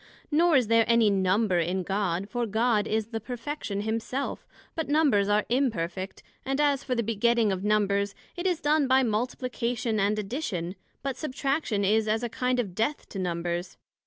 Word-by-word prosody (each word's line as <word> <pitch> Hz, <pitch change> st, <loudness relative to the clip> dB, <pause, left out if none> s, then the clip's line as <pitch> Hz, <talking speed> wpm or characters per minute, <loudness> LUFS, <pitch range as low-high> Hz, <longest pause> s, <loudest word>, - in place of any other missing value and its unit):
Nor 330 Hz, +2 st, +4 dB
is 255 Hz, -3 st, +4 dB
there 230 Hz, +1 st, +4 dB
any 230 Hz, -3 st, +4 dB
Number 190 Hz, 0 st, +2 dB
in 180 Hz, +3 st, 0 dB
God, 195 Hz, -1 st, -1 dB
for 240 Hz, +1 st, -2 dB
God 220 Hz, 0 st, +1 dB
is 220 Hz, 0 st, -1 dB
the 225 Hz, -1 st, -3 dB
perfection 240 Hz, -2 st, -4 dB
Himself; 225 Hz, +5 st, -3 dB, 0.3 s
but 320 Hz, -4 st, -3 dB
Numbers 275 Hz, -10 st, +3 dB
are 210 Hz, 0 st, +2 dB
imperfect; 195 Hz, -8 st, -1 dB, 0.2 s
and 270 Hz, +1 st, -2 dB
as 285 Hz, -2 st, +2 dB
for 255 Hz, -, -1 dB
the 235 Hz, -, 0 dB
begetting 230 Hz, 0 st, +2 dB
of 190 Hz, 0 st, -3 dB
numbers, 200 Hz, -1 st, +1 dB, 0.2 s
it 350 Hz, +1 st, -2 dB
is 355 Hz, -3 st, +1 dB
done 295 Hz, -1 st, +3 dB
by 260 Hz, +1 st, +4 dB
Multiplication 235 Hz, 0 st, -1 dB
and 205 Hz, +2 st, +2 dB
Addition; 200 Hz, -, -3 dB, 0.3 s
but 270 Hz, -2 st, -2 dB
Substraction 275 Hz, -6 st, -1 dB
is 220 Hz, +2 st, +2 dB
as 220 Hz, +2 st, 0 dB
a 240 Hz, -, -1 dB
kind 250 Hz, +2 st, 0 dB
of 200 Hz, -7 st, -2 dB
death 225 Hz, +9 st, -1 dB
to 195 Hz, -, -6 dB
Numbers. 175 Hz, 0 st, -3 dB
225 Hz, 175 wpm, -27 LUFS, 200-255 Hz, 0.3 s, Nor